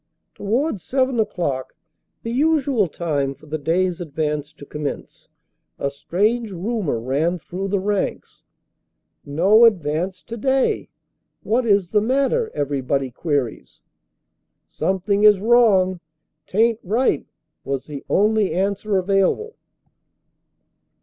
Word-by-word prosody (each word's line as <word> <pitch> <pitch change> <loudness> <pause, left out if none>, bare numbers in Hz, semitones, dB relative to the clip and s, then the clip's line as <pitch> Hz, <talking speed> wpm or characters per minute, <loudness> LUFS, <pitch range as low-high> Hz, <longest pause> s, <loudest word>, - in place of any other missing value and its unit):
To - - -17
wards 230 - 0
seven 260 +1 0
o 220 - +4
clock, 140 -10 -3 0.5
the 230 - -4
usual 275 - +2
time 145 -5 -2
for 145 - -19
the 155 +1 -4
day 165 +6 +1
s 180 -1 -3
advance 150 -2 -3
to 145 - -13
commence, 150 0 -6 0.5
a 140 - -2
strange 210 +11 0
rumor 190 - -2
ran 145 +9 0
through 185 +3 -5
the 200 0 0
ranks: 200 +1 -3 0.8
No 185 +10 +4
ad 225 -5 +6
vance 180 +5 -3
today. 265 +3 0 0.5
What 235 +2 +1
is 200 -4 +2
the 210 - +3
matter? 275 - +1
everybody 140 -2 -1
queries 140 -4 -3 0.8
Something 200 +2 -1
is 210 -2 +7
wrong 200 -5 +4 0.5
t 185 - -7
aint 225 0 +3
right, 225 +8 0 0.4
was 135 -1 -3
the 145 -3 -8
only 210 -3 +2
answer 200 +2 0
available. 195 - +1
190 Hz, 125 wpm, -21 LUFS, 155-225 Hz, 0.8 s, is